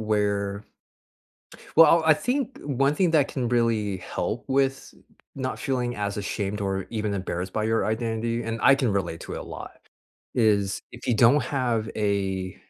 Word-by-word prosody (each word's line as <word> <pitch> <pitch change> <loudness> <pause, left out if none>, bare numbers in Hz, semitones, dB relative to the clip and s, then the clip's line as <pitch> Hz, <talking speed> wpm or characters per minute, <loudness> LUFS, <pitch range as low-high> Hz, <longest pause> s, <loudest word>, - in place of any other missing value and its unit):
where 100 -2 -1 1.1
well, 165 +1 +7
I 160 - +5
I - - +9
think 250 - -2
one 140 +1 +1
thing 180 0 +2
that 150 -4 +4
can 125 -3 -2
really 115 -5 +1
help 110 +5 -4
with 135 0 0 0.4
not 130 -1 -3
feeling 125 -4 -1
as 100 -1 -2
ashamed 100 0 -3
or 95 -1 -2
even 105 -2 -2
embarrassed 95 -1 -4
by 110 - -1
your 110 +1 +1
identity, 115 +1 -1
and 115 0 -3
I 140 - +7
can 130 -5 0
relate 90 -4 -2
to - - -7
it - - -4
a - - -5
lot, - - -10 0.5
is, 100 -4 +2
if 120 - -10
you 120 - +2
don't 125 +6 +5
have 120 -4 -1
a 95 -3 -1
115 Hz, 170 wpm, -25 LUFS, 100-130 Hz, 1.1 s, I